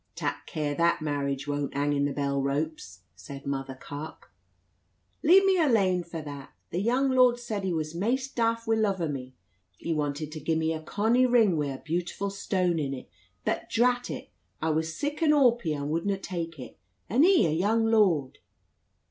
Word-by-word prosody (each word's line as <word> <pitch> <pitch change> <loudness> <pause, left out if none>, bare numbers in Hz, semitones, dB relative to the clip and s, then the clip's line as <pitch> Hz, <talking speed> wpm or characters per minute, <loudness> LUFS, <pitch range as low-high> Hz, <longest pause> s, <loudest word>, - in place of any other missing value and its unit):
"Tak - - -3
care 150 -2 -2
that 170 +1 +1
marriage 140 -2 -2
won't 145 -1 -2
hang 145 +1 +1
i' 140 0 +1
the 145 - 0
bell 140 0 -1
ropes," 140 - -3
said 135 +10 -10
Mother 135 -1 -3
Carke. 145 +4 -9 0.9
"Leave 375 +5 +6
me 380 -2 +4
alane 200 - +3
for 165 -1 -7
that. 145 -2 -9 0.2
The 175 - -1
young 255 +5 +2
lord 250 -2 +5
said 220 -4 -4
he 190 - -1
was 155 -2 -2
maist 255 +9 -1
daft 230 -1 +1
wi' 225 - +2
luv 200 -3 +1
o' 165 - 0
me. 130 -3 -6 0.4
He 170 - -2
wanted 150 0 -2
to 155 - -6
gie 160 +2 -1
me 160 0 0
a 160 - -5
conny 225 +9 +2
ring 230 -7 +4
wi' 150 -2 0
a 135 -1 -5
beautiful 175 +4 -2
stone 185 -3 0
in 140 -2 -2
it. 130 - -11 0.3
But, - - -2
drat 245 +1 +2
it, - - -7 0.3
I 160 0 0
was 160 +1 -1
sic 290 +2 -3
an 310 -2 +5
awpy 235 - +3
I - - -4
wudna 165 +7 -1
tak 170 -4 -5
it, 130 - -10 0.3
and 245 - +3
he 365 - +5
a 160 - +1
young 210 +8 +2
lord!" 190 - +2
170 Hz, 190 wpm, -27 LUFS, 145-225 Hz, 0.9 s, Leave